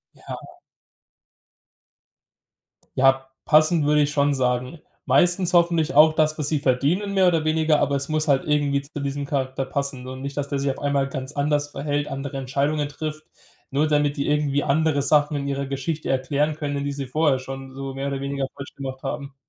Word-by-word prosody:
Ja. - - -10 2.4
Ja, 135 0 +3
passend 155 +1 +4
würde 150 0 +4
ich 145 - -1
schon 145 -1 +2
sagen. 125 +3 -1 0.3
Meistens 175 +6 +3
hoffentlich 170 -2 +3
auch 155 +2 +7
das, 155 0 +1
was 150 - 0
sie 150 -1 +1
verdienen, 145 +10 +1
mehr 190 -1 +4
oder 165 -3 +2
weniger, 155 -1 +2
aber 140 - +1
es 140 0 -4
muss 155 0 -1
halt 135 -1 +3
irgendwie 145 -2 +1
zu 145 +1 -7
diesem 140 0 -3
Charakter 135 -1 -2
passen 135 -2 -4
und 130 0 -7
nicht, 140 +1 -6
dass 145 -1 -1
der 140 -1 -2
sich 140 0 0
auf - - -8
einmal 140 -1 0
ganz 135 +1 -5
anders 145 0 0
verhält, 145 0 -2
andere 135 0 -5
Entscheidungen 140 +3 -1
trifft, 155 +1 -6 0.4
nur 145 +3 +1
damit 145 -1 +2
die 140 - -2
irgendwie 145 -1 +1
andere 150 0 +2
Sachen 150 +2 +3
in 140 -1 -2
ihrer 140 0 -2
Geschichte 140 +3 -3
erklären 140 +3 0
können, 145 -2 -3
die 145 - -2
sie 140 -1 -4
vorher 145 +1 +2
schon 135 0 -8
so 135 0 -6
mehr 135 +1 -3
oder 140 -1 -3
weniger 140 -1 -2
falsch 140 0 -9
gemacht 130 -1 -7
haben. 140 0 -5
140 Hz, 190 wpm, -23 LUFS, 135-150 Hz, 2.4 s, auch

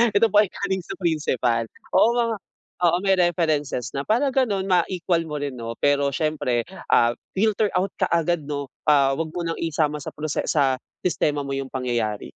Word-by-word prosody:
eto 225 0 +4
po 205 - +6
ay 210 - +4
galing 190 +1 -2
sa 175 - -7
principal, 130 - 0 0.2
oo 225 - +5
mga 230 -2 +1 0.4
oo 175 -1 +3
may 195 -1 +4
references 155 -7 0
na 140 0 -4
para 250 +6 +2
ganon, 220 -8 +1
ma-equal 175 -2 +1
mo 150 - -5
rin 145 -1 -3
'no, 115 0 -5
pero 140 -1 +2
siyempre, 150 -7 0 0.2
ah, 120 0 +4 0.2
filter 215 +1 +2
out 185 +1 +1
ka - - +2
agad 170 0 +1
'no, 145 -2 -4 0.2
ah, 140 -2 +5
wag 165 - -1
mo 175 - -2
ng 165 0 -3
isama 150 -2 0
sa - - -8
prose 150 -1 -3
sa 135 -4 +2 0.2
sistema 150 -5 0
mo 140 - -5
yung 135 -1 -3
pangyayari. 120 -5 -2
155 Hz, 185 wpm, -23 LUFS, 140-185 Hz, 0.4 s, po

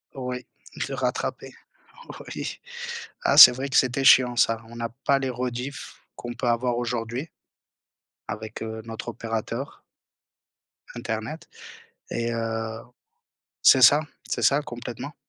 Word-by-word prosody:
Oui, 125 -1 -5 0.4
le - - -4
rattraper, - - -3 0.8
oui. - - -5 0.6
Ah, - - +2
c'est - - +13
vrai 135 +3 -4
que - - -4
c'était 130 +1 +2
chiant 125 -2 +6
ça, 115 -1 +2
on 120 - -12
n'a 115 0 -4
pas 135 +3 0
les 135 -1 -2
rediffusions 125 +1 -5
qu'on 120 0 -7
peut 120 0 -3
avoir 120 +1 +1
aujourd'hui, 120 +4 -3 1.0
avec 110 +1 -6
heu, 110 0 -6
notre 115 +1 -7
opérateur. 115 +3 -5 1.1
Internet 120 +5 -5 0.6
et 115 0 -2
heu, 115 0 -3 0.8
c'est 130 - +7
ça, 145 +5 +8 0.3
c'est - - -2
ça, 140 +2 +4
complètement 125 +3 -7
120 Hz, 125 wpm, -25 LUFS, 115-130 Hz, 1.1 s, c'est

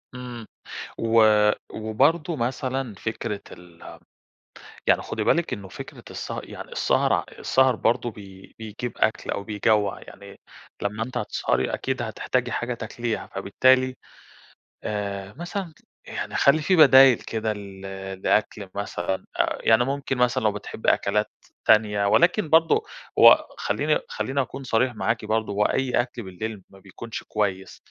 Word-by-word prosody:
إمم 125 -2 -7 0.5
و 115 0 +4 0.5
وبرضو 145 +10 +1
مثلًا 130 -1 -2
فكرة 105 0 -4
ال 85 -1 -13 0.9
يعني - - +4
خُدي - - -3
بالِك 170 0 +2
إنّه 100 -2 -5
فكرة - - -10
السه - - -5
يعني - - -10
السهر، - - +1
آع - - 0
السهر 130 -2 +3
برضو 120 +1 +1
بي 95 -3 -13
بيجيب 110 +2 -6
أكل 110 - 0
أو 100 - -3
بيجوَّع 105 -1 +1
يعني، 100 0 -13 0.4
لمّا 105 +2 -2
أنتِ 125 0 -9
هتسهري 65 - -1
أكيد 130 -2 -2
هتحتاجي 125 +2 -2
حاجة 120 0 -2
تاكليها 115 +1 -4
فبالتالي، 130 +6 +2 0.9
آآ، 100 -1 -4
مثلًا 175 0 -5 0.3
يعني - - -5
خلّي 145 +3 +4
في 185 +5 +2
بدايل 135 -5 +8
كده 110 -1 -3
ل 100 -2 -10 0.4
لأكل 105 -1 0
مثلًا 95 -2 -3
أ - - +1
يعني 115 +2 +4
ممكن 135 -1 -2
مثلًا 125 -2 +2
لو 105 - +3
بتحبي 105 +2 -1
أكلات 105 +2 0 0.4
تانية، 105 -2 +4
ولكن 170 - +3
برضو 165 - +4 0.3
هو - - +8
خلّيني - - 0
خلّيني 140 - -1
أكون 135 +1 -6
صريح 125 0 +1
معاكِ 115 0 -1
برضو 110 0 -1
هو 105 +1 +2
أي 130 0 +1
أكل 120 -2 -7
بالليل 95 +2 -6
ما 95 - -17
بيكونش 100 +4 -8
كويّس، 95 -3 -2
110 Hz, 140 wpm, -24 LUFS, 105-130 Hz, 0.9 s, بدايل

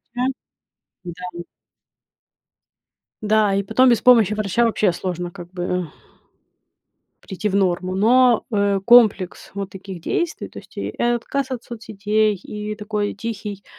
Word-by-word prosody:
врача 250 +1 0 0.8
да. 175 0 -7 1.8
Да, 215 -1 +2
и 200 - +1
потом 255 +6 +4
без 235 -2 +4
помощи 230 -5 +5
врача 215 +2 +1
вообще 215 -4 +2
сложно, 175 0 -4
как 175 -1 -11
бы 180 -2 -3 1.3
прийти 195 +2 -3
в 195 - -3
норму. 185 -1 0
Но, 240 +3 +4
э, 200 -1 +1
комплекс 215 -5 +4
вот 200 -1 -5
таких 190 -1 -9
действий, 340 - -2
то - - -11
есть - - -21
и - - -3
отказ 240 +3 -1
от 250 -2 -5
соцсетей, 215 -2 -1
и 210 +3 -6
такой 210 -1 -3
тихий, 205 -2 -6
205 Hz, 130 wpm, -21 LUFS, 185-230 Hz, 1.8 s, помощи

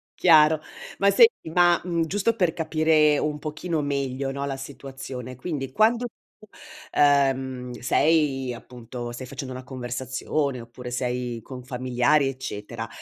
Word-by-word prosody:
chiaro! 155 -2 +6 0.4
Ma 200 0 +5
senti, 460 - +4
ma, 175 +1 +4
mhmm, 170 -2 0
giusto 205 +6 0
per 180 -6 +1
capire 155 -2 +3
un 150 -1 -1
pochino 155 +2 -3
meglio, 135 -1 -2
no, 140 +1 -3
la 135 -1 -3
situazione, 135 -2 -8
quindi 135 -1 -4
quando 230 - +3
tu, 215 - -22 0.5
uhm, 135 -3 +2
sei 135 -2 +2
appunto 120 0 -8
stai 125 +2 -7
facendo 130 0 -6
una 130 - -7
conversazione 130 +2 -3
oppure 120 +1 -9
sei 125 -1 -2
con 125 +2 -9
familiari 130 +3 +1
eccetera, 105 -6 -6
135 Hz, 135 wpm, -25 LUFS, 125-155 Hz, 0.5 s, chiaro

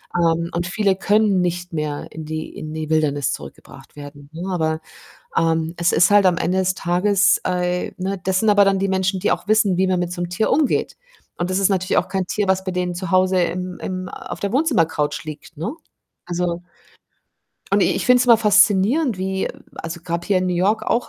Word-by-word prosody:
Ähm, 170 0 +1
und 175 +1 -2
viele 195 0 +1
können 205 -1 +2
nicht 175 0 -3
mehr 150 -2 -3
in 160 -1 -8
die 155 0 -5
in 155 0 -7
die 155 -1 -5
Wildnis 145 -3 +1
zurückgebracht - - -11
werden, 145 0 -11
ne, 175 +4 -6
aber, 160 -2 0 0.6
ähm, 165 0 +1
es 170 +1 +1
ist 170 +2 +4
halt 205 -1 +5
am 175 -2 +3
Ende 185 +2 0
des 185 0 +1
Tages, 185 +3 +2
äh 180 0 -1
ne, 190 +1 -3
das 190 0 +1
sind 220 - +1
aber 205 -1 +6
dann 195 -1 +2
die 195 0 0
Menschen, 190 0 0
die 205 - +1
auch - - -4
wissen, 215 -4 +3
wie 190 +1 +2
man 185 -1 +1
mit 175 0 -3
so 175 -1 -4
'nem 175 - -4
Tier 195 +5 0
umgeht. 300 -3 +1 0.4
Und 175 +1 -2
das 185 - +1
ist 195 - +3
natürlich 185 -1 +1
auch - - -1
kein 190 -2 -2
Tier, 205 +1 -1
was 190 0 +1
bei 185 - -2
denen 180 -1 -2
zu 185 +2 -5
Hause 185 -1 +3
im 180 +1 -3
im 185 0 -4
auf - - -8
der 200 +1 -2
Wohnzimmercouch 165 - 0
liegt, 155 +1 -10
ne? 165 - -3 0.5
Also 175 0 -2 1.1
und - - +3
i - - +5
ich - - -2
finde 250 0 +5
es 250 - +2
immer 235 -2 +7
faszinierend 210 - +3
wie 190 0 -2 0.3
also, 165 +1 -6
gab 170 0 -3
hier 200 -3 +2
in 185 - 0
New 180 - 0
York 210 +5 +1
auch - - +1
185 Hz, 215 wpm, -21 LUFS, 170-195 Hz, 1.1 s, immer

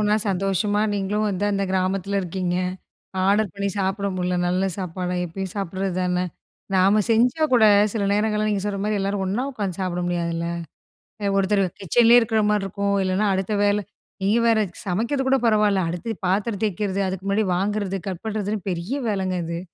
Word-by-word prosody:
ஒன்னா 210 0 +3
சந்தோஷமா 195 +2 0
நீங்களும் 205 +2 -1
வந்து 200 +1 -1
அந்த 195 0 0
கிராமத்துல 190 +1 0
இருக்கீங்க. 180 0 -2 0.7
ஆடர் 205 +1 +3
பண்ணி 200 0 -2
சாப்பிட 195 +1 -1
முட்ல 180 0 0
நல்ல 180 +2 +1
சாப்பாடா 180 0 -3
எப்பயும் 185 +2 -5
சாப்பிடறது 190 -1 -2
தான. 180 0 0 0.5
நாம 195 +3 +4
செஞ்சா 245 +7 +3
கூட 235 -3 +5 0.3
சில 210 -3 -1
நேரங்கள்ள 210 0 +1
நீங்க 200 -2 0
சொல்ற 200 -1 -2
மாரி 210 -1 0
எல்லாரும் 195 0 -1
ஒன்னா 205 +7 -1
உக்காந்து 200 -6 -4
சாப்பிட 180 -1 -2
முடியாதுல்ல. 170 -1 -1 0.9
ஒருத்தரு 195 0 +2 0.2
கிச்சன்லே 235 +6 +5
இருக்கற 220 -1 +1
மாரி 210 -2 +1
இருக்கும். 200 +1 -1
இல்லனா 190 +3 +1
அடுத்த 190 +2 -2
வேல, 205 0 +2 0.4
நீங்க 210 +4 +3
வேற 225 -1 +4 0.3
சமைக்கிறது 235 +9 -1
கூட 270 - +4
பரவாயில்ல. 210 -3 +3
அடுத்த 185 +6 -4
பாத்திரம் 200 +2 0
தேய்க்கிறது, 200 -1 -1
அதுக்கு 190 0 -6
முன்னாடி 205 +1 +1
வாங்கறது, 195 0 -1
கட் 185 0 -5
பண்ணுறதுன்னு 210 -2 -3
பெரிய 175 +6 -4 0.2
வேலங்க 190 -2 -1
அது. 170 +1 -4
195 Hz, 160 wpm, -23 LUFS, 185-210 Hz, 0.9 s, கூட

